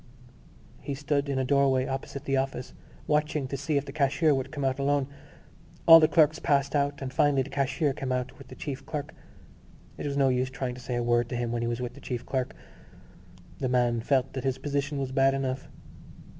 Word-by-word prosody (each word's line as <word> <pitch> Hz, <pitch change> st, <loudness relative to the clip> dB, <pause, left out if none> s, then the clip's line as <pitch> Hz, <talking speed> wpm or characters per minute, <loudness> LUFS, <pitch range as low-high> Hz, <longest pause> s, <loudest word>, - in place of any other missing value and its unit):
He 140 Hz, -, -4 dB
stood 145 Hz, 0 st, -1 dB
in 135 Hz, -, -1 dB
a 130 Hz, -, +1 dB
doorway 135 Hz, -1 st, +3 dB
opposite 135 Hz, +1 st, -5 dB
the 135 Hz, -, +1 dB
office 135 Hz, -1 st, -2 dB, 0.3 s
watching 150 Hz, -2 st, 0 dB
to 140 Hz, -, -4 dB
see 140 Hz, +2 st, -1 dB
if 140 Hz, -, -1 dB
the 140 Hz, -, -7 dB
cashier 145 Hz, +2 st, +2 dB
would 135 Hz, 0 st, -2 dB
come 145 Hz, -3 st, -3 dB
out 135 Hz, +1 st, 0 dB
alone. 140 Hz, 0 st, +2 dB, 0.8 s
All 165 Hz, 0 st, +11 dB
the 155 Hz, -, +5 dB
clerks 155 Hz, -1 st, +4 dB
passed 140 Hz, 0 st, +1 dB
out 145 Hz, -1 st, 0 dB
and 130 Hz, -1 st, -5 dB
finally 140 Hz, -2 st, +3 dB
the 135 Hz, -, -11 dB
cashier 140 Hz, +2 st, 0 dB
came 130 Hz, 0 st, -4 dB
out 125 Hz, +1 st, -2 dB
with -, -, -12 dB
the -, -, -11 dB
chief 135 Hz, -2 st, -5 dB
clerk. 150 Hz, 0 st, -5 dB, 0.9 s
It -, -, -3 dB
was 140 Hz, 0 st, -2 dB
no 135 Hz, -1 st, +4 dB
use 130 Hz, 0 st, +1 dB
trying 130 Hz, -1 st, -4 dB
to 125 Hz, -, -10 dB
say 125 Hz, 0 st, -4 dB
a 120 Hz, -, 0 dB
word 120 Hz, 0 st, +2 dB
to -, -, -3 dB
him 120 Hz, -1 st, -2 dB
when 120 Hz, 0 st, -1 dB
he 120 Hz, -, -1 dB
was 120 Hz, +1 st, -2 dB
with 125 Hz, -1 st, -4 dB
the -, -, -14 dB
chief 125 Hz, -2 st, -4 dB
clerk. 130 Hz, -2 st, -2 dB, 1.0 s
The 130 Hz, -, -1 dB
man 120 Hz, -2 st, +2 dB
felt 135 Hz, +1 st, +1 dB
that 130 Hz, -, -4 dB
his 135 Hz, -1 st, 0 dB
position 145 Hz, 0 st, -2 dB
was 135 Hz, -1 st, -2 dB
bad 135 Hz, 0 st, +3 dB
enough. 130 Hz, -1 st, -3 dB
135 Hz, 220 wpm, -28 LUFS, 130-140 Hz, 1.0 s, All